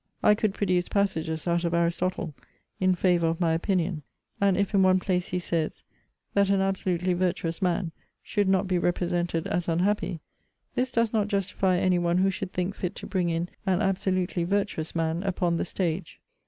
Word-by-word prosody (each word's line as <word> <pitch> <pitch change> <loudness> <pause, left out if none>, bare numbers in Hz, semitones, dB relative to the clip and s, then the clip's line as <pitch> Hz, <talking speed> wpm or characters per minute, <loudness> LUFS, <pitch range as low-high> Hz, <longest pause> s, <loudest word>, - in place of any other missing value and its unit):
I 210 - +7
could 210 -1 0
produce 180 -3 +1
passages 165 -5 -1
out 170 0 +1
of 170 0 0
Aristotle 170 -1 0 0.5
in 185 -1 +3
favour 175 -2 +2
of 165 0 -1
my 165 -2 +2
opinion; 170 -1 0 0.4
and 195 -2 +3
if 200 +1 0
in 195 - +4
one 185 0 +5
place 180 -1 -1
he 180 - -2
says, 170 -3 -2 0.5
that 200 -1 +3
an 195 -1 +3
absolutely 185 -2 0
virtuous 175 -1 -1
man 180 -2 0 0.3
should 205 -3 0
not 190 0 +2
be 180 -1 +1
represented 175 -1 0
as 175 - -1
unhappy, 175 +1 0 0.5
this 255 +1 0
does 230 -2 +1
not 210 -2 +2
justify 195 -2 +1
any 180 0 +2
one 175 0 +1
who 190 +1 +3
should 190 -1 -5
think 180 +2 -2
fit 180 -2 -4
to - - -8
bring 180 -3 0
in 170 +1 -1 0.2
an 185 -1 +3
absolutely 185 -3 0
virtuous 190 -4 -1
man 165 +1 0
upon 180 -3 0
the - - -1
stage. 175 -1 -3
180 Hz, 180 wpm, -27 LUFS, 170-195 Hz, 0.5 s, I